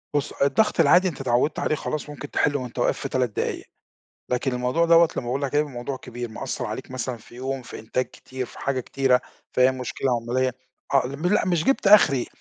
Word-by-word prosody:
بُص، 145 Hz, -, 0 dB
الضغط 140 Hz, +11 st, +2 dB
العادي 175 Hz, +4 st, +6 dB
أنت 150 Hz, -6 st, -4 dB
اتعوّدت 125 Hz, +4 st, +1 dB
عليه 155 Hz, -, +1 dB
خلاص 150 Hz, 0 st, -4 dB
ممكن 145 Hz, 0 st, -8 dB
تحِلّه 145 Hz, -1 st, +1 dB
وأنت 125 Hz, -1 st, -7 dB
واقف -, -, +1 dB
في -, -, -4 dB
3 130 Hz, -2 st, +1 dB
دقايق. 105 Hz, -, -3 dB, 0.6 s
لكن 125 Hz, +1 st, 0 dB
الموضوع 125 Hz, +7 st, +1 dB
دوَّة 170 Hz, 0 st, +6 dB
لمّا 120 Hz, -, -3 dB
باقول 135 Hz, +4 st, -2 dB
لك 140 Hz, 0 st, -2 dB
هيبقي 150 Hz, 0 st, +2 dB
الموضوع 130 Hz, +1 st, -5 dB
كبير 120 Hz, -1 st, -7 dB
مأثّر -, -, -4 dB
عليك -, -, -6 dB
مثلًا 130 Hz, -1 st, -3 dB
في 115 Hz, +2 st, -17 dB
يوم، 130 Hz, +1 st, -4 dB
في -, -, -9 dB
إنتاج 120 Hz, +4 st, -1 dB
كتير، 130 Hz, -1 st, -7 dB
في -, -, -14 dB
حاجة 135 Hz, -2 st, -1 dB
كتيرة، 130 Hz, 0 st, +2 dB, 0.3 s
في 125 Hz, -, +5 dB
أى -, -, +3 dB
مشكلة 130 Hz, +1 st, -3 dB
عملية، 125 Hz, +2 st, 0 dB, 0.4 s
آه 135 Hz, -2 st, +4 dB
ل 140 Hz, -, -6 dB
م 175 Hz, -, -1 dB
لأ -, -, +2 dB
مش 170 Hz, -3 st, +1 dB
جِبت 270 Hz, -5 st, +1 dB
أخري، 165 Hz, -11 st, +6 dB
130 Hz, 220 wpm, -24 LUFS, 125-150 Hz, 0.6 s, العادي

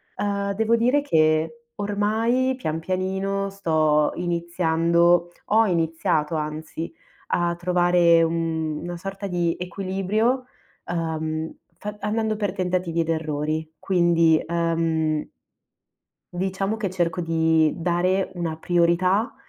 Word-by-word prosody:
Uhm 200 Hz, -1 st, -1 dB
devo 225 Hz, +2 st, +2 dB
dire 250 Hz, +5 st, +3 dB
che 160 Hz, -, +1 dB
ormai 220 Hz, +5 st, 0 dB
pian 160 Hz, -10 st, -3 dB
pianino 190 Hz, +3 st, -2 dB
sto 155 Hz, -5 st, +2 dB
iniziando, 170 Hz, 0 st, +2 dB, 0.2 s
ho 225 Hz, +2 st, +4 dB
iniziato, 165 Hz, -3 st, 0 dB
anzi, 155 Hz, +2 st, -4 dB, 0.4 s
a 175 Hz, 0 st, +1 dB
trovare 175 Hz, -1 st, +4 dB
una 165 Hz, 0 st, -2 dB
sorta 195 Hz, +2 st, -6 dB
di 175 Hz, -2 st, 0 dB
equilibrio, 195 Hz, +7 st, -1 dB, 0.4 s
uhm, 160 Hz, -2 st, -3 dB, 0.2 s
fa 210 Hz, +2 st, -6 dB
andando 215 Hz, +1 st, -1 dB
per 205 Hz, -3 st, -1 dB
tentativi 180 Hz, -3 st, -1 dB
ed 165 Hz, -, -3 dB
errori. 155 Hz, 0 st, -2 dB
Quindi 170 Hz, -3 st, +3 dB
uhm 165 Hz, -2 st, 0 dB, 1.1 s
diciamo 190 Hz, +3 st, -1 dB
che 205 Hz, -4 st, -2 dB
cerco 175 Hz, -1 st, -1 dB
di 160 Hz, -2 st, +2 dB
dare 180 Hz, +3 st, 0 dB
una 170 Hz, -3 st, -3 dB
priorità, 175 Hz, +6 st, +2 dB
175 Hz, 105 wpm, -24 LUFS, 160-195 Hz, 1.1 s, ho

